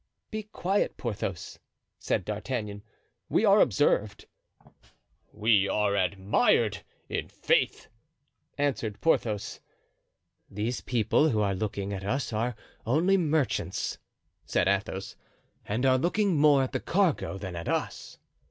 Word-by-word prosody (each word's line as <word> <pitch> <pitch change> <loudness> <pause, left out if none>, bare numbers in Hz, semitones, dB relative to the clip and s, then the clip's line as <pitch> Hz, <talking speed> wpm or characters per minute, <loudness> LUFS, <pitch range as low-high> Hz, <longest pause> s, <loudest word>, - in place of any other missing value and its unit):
"Be 215 - -3
quiet, 200 -2 -1
Porthos," 100 -7 -4 0.4
said 90 - -1
D'Artagnan, 105 -1 -4 0.5
"we - - +3
are - - +6
observed." - - +1 1.1
"We 105 -2 +3
are 105 0 +1
admired, 100 +1 +2 0.3
i'faith," - - 0 0.7
answered 130 -7 -1
Porthos. 110 -10 0 0.9
"These 110 +5 -3
people 125 +6 +2
who 110 -6 +1
are 100 -2 +1
looking 100 0 -3
at 95 -1 -5
us 125 +4 -2
are 115 +2 -1 0.3
only 165 +11 +3
merchants," 160 -6 0 0.4
said 90 - 0
Athos, 100 0 -1 0.5
"and 115 +6 -1
are 130 -1 +4
looking 190 +4 +1
more 145 -2 +5
at 130 - -3
the - - -1
cargo 175 - 0
than 95 -3 -6
at 85 0 -5
us." - - -3
110 Hz, 115 wpm, -28 LUFS, 100-145 Hz, 1.1 s, are